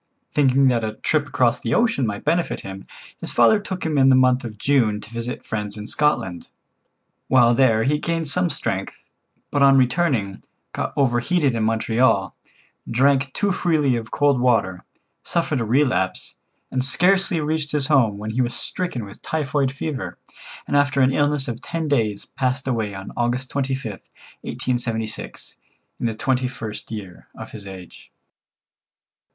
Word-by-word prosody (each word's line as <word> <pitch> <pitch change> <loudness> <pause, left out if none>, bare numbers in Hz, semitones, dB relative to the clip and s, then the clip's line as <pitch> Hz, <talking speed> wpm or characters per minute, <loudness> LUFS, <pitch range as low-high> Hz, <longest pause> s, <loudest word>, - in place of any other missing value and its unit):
Thinking 135 -1 +4
that 120 -2 +1
a 110 0 -3
trip 145 +5 0
across 125 -3 +1
the 115 +1 -1
ocean 220 - +2
might 100 -1 -4
benefit 170 +3 0
him, 95 0 -9 0.3
his - - -4
father 215 - +5
took 190 -4 -5
him 155 -3 +1
in 135 0 +6
the 130 - +6
month 130 0 +3
of 110 -3 -7
June 115 -4 +2
to 110 - -12
visit 115 +1 -5
friends 105 -1 -4
in 105 - -6
Scotland. 105 - 0 0.8
While 120 -2 +5
there 115 -3 +3
he 150 +4 +1
gained 165 -1 -2
some 175 +4 +2
strength, 110 -9 -4 0.4
but 145 - 0
on 135 -1 +6
returning, 125 - +1 0.3
got - - -2
overheated 135 +3 +2
in 115 -1 -1
Montreal, 110 -2 +1 0.5
drank 135 +2 +2
too 205 -1 0
freely 155 -8 +1
of 115 -2 -5
cold 145 -3 +2
water, 95 -8 +1 0.4
suffered 155 -6 -1
a - - -1
relapse, 120 -6 0 0.4
and 130 -1 0
scarcely 180 +5 +3
reached 150 0 -2
his 150 -2 +3
home 130 -8 +3
when 105 +1 -5
he 125 +4 0
was 120 -1 -1
stricken 125 - -4
with 100 - -13
typhoid 145 -3 -1
fever, 140 0 -5 0.5
and - - -1
after 140 -1 +3
an 130 +1 +4
illness 145 -1 +1
of 120 0 -5
ten 165 -2 -3
days 110 -8 0
passed 130 +1 -2
away 110 -5 -1
on 95 0 -8
August 120 +2 -1
25th, 130 -6 -3 0.3
1876, 115 -3 -4 0.4
in 120 - 0
the 110 - -3
twenty 130 +2 0
first 110 -4 -7
year 100 -5 -8
of - - -9
his 105 -2 -9
age. 95 -2 -11
130 Hz, 160 wpm, -22 LUFS, 110-145 Hz, 0.8 s, in